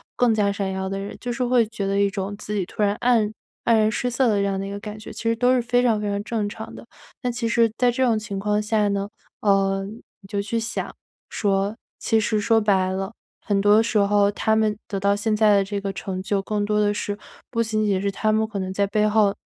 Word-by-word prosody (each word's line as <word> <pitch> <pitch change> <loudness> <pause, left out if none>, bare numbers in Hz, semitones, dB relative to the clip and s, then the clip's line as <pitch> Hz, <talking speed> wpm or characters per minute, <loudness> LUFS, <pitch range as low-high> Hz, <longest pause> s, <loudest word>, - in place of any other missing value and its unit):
更 245 -2 +3
加 205 -2 +2
闪 200 -1 -2
耀 190 0 -3
的 195 - -3
人。 200 - -6
就 245 - -3
是 250 +1 -1
会 245 -1 +3
觉 210 -3 -4
得 200 0 +1
一 200 - +3
种 195 0 -4
自 210 0 -6
己 195 - 0
突 210 - -6
然 205 0 +2
黯 235 -3 +3
黯 - - -13 0.4
然 215 0 +3
失 245 +3 -1
色 260 +1 +2
的 210 - +2
这 200 - +1
样 195 -1 -1
的 195 - -3
一 - - -6
个 200 - -5
感 210 +1 -7
觉， 215 - -9
其 - - -8
实 230 0 +2
都 250 +2 +3
是 245 - +2
非 245 +1 +1
常 225 -4 +2
非 210 - -2
常 200 0 -1
正 215 -3 -2
常 220 +1 -8
的。 - - -10 0.4
但 250 -2 -1
其 235 -1 -2
实 230 -1 +3
在 245 -1 +3
这 260 +2 0
种 225 -3 +2
情 205 -2 -5
况 210 +1 +1
下 210 -1 +1
呢， 200 0 -1 0.3
呃， 195 -1 +2
你 210 -1 -13
就 200 +1 -2
去 215 +3 -2
想 225 - -4 0.3
说， 200 0 0 0.2
其 225 - +2
实 215 -1 0
说 225 +1 +3
白 190 -3 +2
了， 190 +3 -3 0.3
很 200 -2 0
多 205 +2 +5
时 220 -1 0
候 200 0 +3
他 220 +1 +1
们 215 -2 +1
得 200 - -3
到 200 +1 +2
现 215 +1 0
在 210 -1 +5
的 200 - +3
这 200 0 -3
个 195 0 -2
成 185 -1 -4
就， 200 0 0
更 205 +1 -2
多 210 0 +1
的 205 0 +2
是 205 0 -3 0.3
不 230 -1 0
仅 215 -1 0
仅 195 -2 +1
是 200 - 0
他 215 +2 0
们 220 0 +1
可 220 - -6
能 185 0 -3
在 200 0 +1
背 210 +1 +2
后， 210 -2 +3
210 Hz, 285 characters per minute, -23 LUFS, 200-220 Hz, 0.4 s, 多